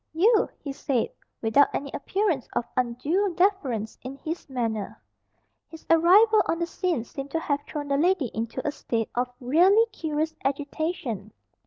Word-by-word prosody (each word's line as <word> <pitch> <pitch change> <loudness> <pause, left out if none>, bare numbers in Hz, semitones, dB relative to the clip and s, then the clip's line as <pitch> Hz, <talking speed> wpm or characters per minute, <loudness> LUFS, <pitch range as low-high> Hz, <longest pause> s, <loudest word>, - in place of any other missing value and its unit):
"You!" 420 +7 +4
he 280 -3 -6
said 270 -4 -1 0.3
without 225 +6 +5
any 280 -1 -3
appearance 365 - -1
of 235 - 0
undue 285 +11 0
deference 280 - 0
in 260 +2 -7
his 320 +2 -6
manner. 225 -5 -3 0.7
His 325 - -12
arrival 400 +7 +6
on 330 - +1
the 340 - 0
scene 335 -6 -1
seemed 275 +3 -7
to 325 - -1
have 285 -3 -1
thrown 295 -2 -5
the 280 - +2
lady 325 - +2
into 230 +5 -3
a - - +1
state 230 -5 -3
of 250 +1 -1
really 360 - +5
curious 315 0 -2
agitation. 280 - -3
290 Hz, 155 wpm, -26 LUFS, 250-345 Hz, 0.7 s, arrival